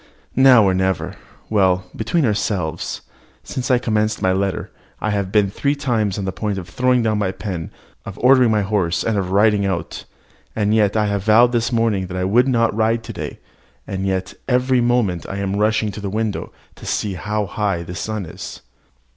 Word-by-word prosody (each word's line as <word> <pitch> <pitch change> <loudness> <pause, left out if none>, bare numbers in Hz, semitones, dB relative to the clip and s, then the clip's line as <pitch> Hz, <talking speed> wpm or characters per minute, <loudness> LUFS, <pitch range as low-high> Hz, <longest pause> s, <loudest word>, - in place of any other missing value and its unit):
Now 130 -3 +7
or 95 -2 +3
never. 95 -1 -1 0.3
Well, 95 -3 +2
between 135 +8 0
ourselves, 100 -7 -2 0.4
since 130 -1 -4
I 125 - +5
commenced 110 -2 0
my 95 - +2
letter, 95 -1 -2 0.3
I 110 - -1
have 100 -2 -1
been 100 -2 +3
three 140 +7 0
times 110 -8 -1
on 100 - -3
the 95 - -1
point 105 0 -3
of 90 -2 -6
throwing 125 +6 +1
down 110 -2 +1
my 100 -3 0
pen, 90 -3 -5 0.3
of 100 0 -8
ordering 130 -1 +5
my 105 -2 +2
horse, 95 -4 0
and 105 -3 0
riding 105 +1 +3
out. 95 -4 -3 0.5
And 105 -1 +1
yet 105 -1 +2
I 105 -1 +1
vowed 110 +5 +5
this 120 +1 0
morning 115 -5 +1
that 90 +1 -5
I 90 - -1
would 115 +7 +3
not 115 -4 +2
ride 115 +1 +1
to - - -7
day, - - -6 0.5
and 95 0 -3
yet 95 -1 -2
every 125 0 +2
moment 120 -8 +1
I 100 - -4
am 100 0 -2
rushing 105 0 +1
to 105 - -8
the 100 - -3
window 110 0 -2 0.3
to - - -11
see 105 -2 -1
how 105 +4 -2
high 100 -3 -2
the 85 - -8
sun 105 +2 -4
is. - - -9
105 Hz, 190 wpm, -20 LUFS, 95-115 Hz, 0.5 s, Now